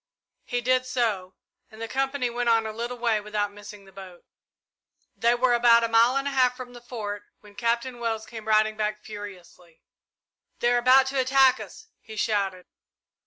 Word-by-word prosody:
He 245 0 -2
did 255 +1 +1
so, 215 -7 -1 0.3
and 220 -1 -15
the 230 - -4
company 270 -1 -1
went 240 0 -1
on 225 -1 +3
a 220 - -3
little 235 +2 -5
way 230 -3 0
without 205 -1 -3
missing 205 -1 -12
the 195 - -17
boat. 190 -2 -12 0.9
They 235 +1 +2
were 245 0 +2
about 235 -1 +5
a - - +2
mile 230 +3 +4
and 275 +1 -1
a - - -1
half 255 -2 +2
from 250 -1 -9
the 240 - -12
Fort 210 -4 -6 0.2
when 210 -1 -17
Captain 235 +2 -2
Wells 225 -2 -2
came 220 -2 -10
riding 215 0 +3
back 210 0 -3
furiously. 185 -5 -11 0.7
"They 240 0 +2
are 240 - +3
about 255 +2 +5
to 270 0 -1
attack 265 0 +4
us," - - -10
he 220 - -12
shouted. 200 -4 -1
230 Hz, 185 wpm, -25 LUFS, 210-245 Hz, 0.9 s, about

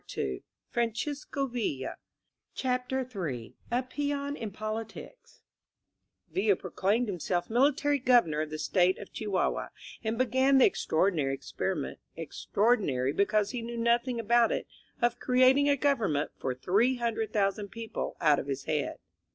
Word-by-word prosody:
INSURGENT 65 -2 -4 0.3
MEXICO 275 +3 -2 1.0
CHAPTER 255 0 -1
m 135 - -4 0.2
A 245 +2 +1
PEON 285 +1 -2
IN 225 -6 -5
POLITICS 220 - -7 0.9
VILLA 200 0 +3
proclaimed 200 +7 0
himself 180 0 -2
military 285 +4 +3
governor 240 - +4
of 155 - -3
the 155 - -5
State 180 +4 +2
of 205 - -10
Chihuahua, 205 -4 -1 0.4
and 220 0 -1
began 260 +2 +3
the 265 - +7
ex - - 0
traordinary 160 -5 +2
experiment— - - -3 0.2
extraordinary 190 - +1
be 200 - +3
cause 210 0 +1
he 245 - -3
knew 235 +1 -5
nothing 235 +1 +1
about 230 +1 +3
it - - -1 0.2
— - - -33
of 240 0 +2
creating 260 +3 +4
a 285 - +3
govern 260 - +2
ment 145 +1 -1
for 130 - -3 0.3
800,000 220 -5 0
people 230 +1 -5
out 150 -3 +4
of - - -5
his 135 -1 -3
head. 150 -1 -1
225 Hz, 140 wpm, -29 LUFS, 185-255 Hz, 1.0 s, the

